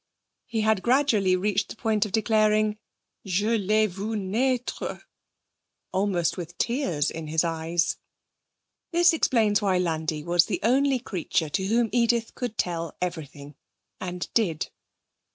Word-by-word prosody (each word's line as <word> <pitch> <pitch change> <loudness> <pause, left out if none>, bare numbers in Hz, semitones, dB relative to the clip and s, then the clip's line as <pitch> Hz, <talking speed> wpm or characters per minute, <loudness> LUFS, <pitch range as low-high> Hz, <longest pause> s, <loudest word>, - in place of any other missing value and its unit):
he 225 -3 -1
had 215 -2 +2
gradually 235 -7 +3
reached 200 +1 0
the - - -7
point 220 -2 0
of - - -11
declaring, 215 0 +2 0.4
'Je 205 +4 +1
l'ai 215 +1 +2
vue 205 +3 -4
naître!' 235 +6 -1 0.9
almost 190 -3 0
with 175 -1 -7
tears 230 - 0
in 160 -1 -6
his 160 +2 +1
eyes. 165 +1 0 0.9
This 345 0 +5
explains 225 -9 +2
why 195 -3 +2
Landi 160 -3 -1
was 170 +1 +3
the - - -2
only 265 +4 +3
creature 180 -8 -2
to 190 +5 -1
whom 230 +2 +2
Edith 235 -1 +1
could 245 -4 -5
tell 170 -3 -2
everything, 150 -5 -5 0.5
and 180 -1 -4
did. 180 -9 0
205 Hz, 135 wpm, -26 LUFS, 175-225 Hz, 0.9 s, This